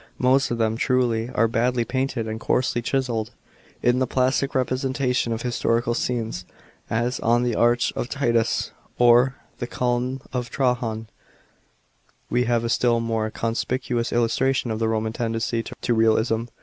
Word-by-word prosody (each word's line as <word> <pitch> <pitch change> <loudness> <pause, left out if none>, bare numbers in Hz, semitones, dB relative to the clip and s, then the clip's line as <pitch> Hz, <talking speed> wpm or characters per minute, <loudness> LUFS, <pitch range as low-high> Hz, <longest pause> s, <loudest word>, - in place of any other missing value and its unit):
Most 130 +2 +3
of 120 - -1
them, 110 -1 0
truly, 120 -2 +1
are 115 -2 +2
badly 120 +1 +1
painted 130 -3 -2
and 110 0 -4
coarsely 120 0 0
chiselled." 120 -3 -1 0.5
In 125 +1 +3
the 130 - +1
plasnc 130 +2 +1
representation 130 -1 0
of 115 0 -3
historical 120 -1 0
scenes 115 -6 -2 0.3
— - - -33 0.2
as 125 +1 -2
on 120 +2 +2
the 120 -1 0
Arch 120 +1 +2
of 120 - -3
Titus 120 -5 0 0.3
or 120 +2 +5 0.2
the 120 - -3
Column 125 +1 -1
of 125 -2 -2
Trajan 120 -3 -1 0.6
— - - -40
we 125 +1 +2
have 120 -1 +1
a 115 - -1
still 120 -1 +2
more 115 -1 -1
conspicuous 120 +2 -2
illustration 120 +2 +1
of 110 - -2
the 115 - +1
Roman 110 0 -1
tendency 115 0 -1
to 120 - -3
realism. 115 0 +2
120 Hz, 155 wpm, -23 LUFS, 115-125 Hz, 0.6 s, or